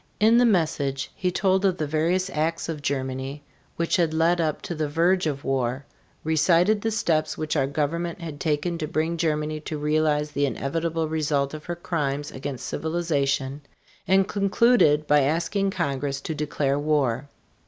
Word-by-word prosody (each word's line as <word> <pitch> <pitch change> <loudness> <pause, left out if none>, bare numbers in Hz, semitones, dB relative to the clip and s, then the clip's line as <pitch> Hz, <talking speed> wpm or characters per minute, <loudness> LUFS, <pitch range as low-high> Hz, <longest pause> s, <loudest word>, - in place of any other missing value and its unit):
In 225 +3 +5
the 245 - +5
message 155 -8 0
he 185 - 0
told 190 +1 +1
of 190 -2 +2
the 155 - -1
various 170 +5 0
acts 160 +2 -1
of 160 -3 -4
Germany 135 +1 -3 0.3
which 170 0 +1
had 165 -3 +1
led 170 +2 +3
up 155 -2 -1
to - - -4
the 155 -2 -2
verge 170 +3 +2
of 140 -2 -3
war, 130 0 -1 0.4
recited 170 +6 +3
the 225 - 0
steps 160 -8 0
which 155 -1 -2
our 135 - +2
government 165 +5 -2
had 160 -4 -7
taken 160 +3 -1
to 155 - -2
bring 160 +3 -1
Germany 155 -2 -1
to 155 0 -5
realize 150 0 +1
the 145 0 +1
inevitable 160 +5 -2
results 150 -3 0
of 155 0 -8
her 175 - -3
crimes 145 -4 -2
against 130 -1 -6
civilization, 145 -4 -1 0.5
and 190 0 +4
concluded 200 -6 +3
by 150 0 +4
asking 170 +8 0
Congress 140 -5 -2
to 160 - -4
declare 145 -2 -1
war. 145 -3 0
155 Hz, 165 wpm, -25 LUFS, 145-170 Hz, 0.5 s, In